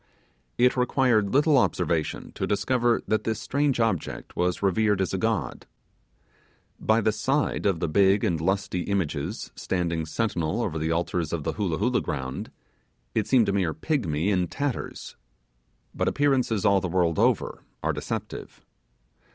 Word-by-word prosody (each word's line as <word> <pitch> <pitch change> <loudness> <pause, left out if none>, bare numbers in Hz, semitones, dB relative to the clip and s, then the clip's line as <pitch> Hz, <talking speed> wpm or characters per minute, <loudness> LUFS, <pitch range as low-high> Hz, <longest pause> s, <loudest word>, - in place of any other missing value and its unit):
It 125 +1 +4
required 125 -4 +2
little 145 0 +4
observation 85 -8 -1
to - - -3
discover 120 +4 +1
that 110 -1 +1
this 110 -1 -1
strange 140 -2 0
object 115 -8 -2
was 90 +2 0
revered 105 +1 +2
as 95 - -1
a 95 - -1
god. 100 - -2 1.1
By 110 +1 +2
the 110 - +2
side 130 +4 0
of 95 -5 +1
the 85 - 0
big 95 +4 +3
and 80 -3 0
lusty 95 0 0
images 85 -7 -2
standing 85 -3 -2
sentinel 100 +1 -1
over 80 -7 -2
the 80 +1 -1
altars 85 -1 -1
of 85 -3 -2
the 80 0 -2
Hoolah 90 -5 -1
Hoolah 125 +4 +1
ground, 65 -2 -4 0.6
it 110 - 0
seemed 125 -4 +4
a 100 - +1
mere 95 -5 0
pigmy 100 - 0
in 90 -2 +1
tatters. 140 +3 -4 0.8
But - - -1
appearances 130 -8 +1
all 100 -1 +4
the 90 - -2
world 85 -2 +1
over - - +1 0.2
are - - +1
deceptive. - - -6
100 Hz, 150 wpm, -26 LUFS, 85-115 Hz, 1.1 s, It